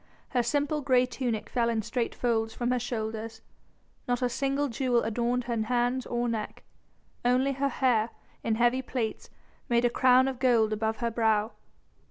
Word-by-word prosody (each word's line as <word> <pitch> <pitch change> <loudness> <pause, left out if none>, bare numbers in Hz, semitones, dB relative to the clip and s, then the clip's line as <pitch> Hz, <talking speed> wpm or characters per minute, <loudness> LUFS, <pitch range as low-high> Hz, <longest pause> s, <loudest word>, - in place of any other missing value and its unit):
Her 250 - +1
simple 290 +5 0
grey 255 -2 +3
tunic 240 -4 -3
fell 235 -2 0
in 225 -2 0
straight 240 +2 -2
folds 225 -2 0
from 240 0 -1
her 250 - +1
shoulders, 225 -1 -4 0.6
not 245 +1 0
a 250 - +2
single 275 +3 0
jewel 245 -1 +1
adorned 240 +2 0
her 235 -2 -2
hands 245 +3 0
or 240 0 -1
neck, 225 -2 -4 0.6
only 255 +3 +3
her 275 +1 0
hair, 240 -5 +2 0.3
in 225 - +1
heavy 240 +3 +2
plaits, 245 -4 -4 0.4
made 240 0 +3
a 240 - +3
crown 255 +1 +5
of 260 -2 -3
gold 230 -4 +3
above 220 +1 -1
her 235 - 0
brow. 220 -1 +1
240 Hz, 170 wpm, -28 LUFS, 225-255 Hz, 0.6 s, crown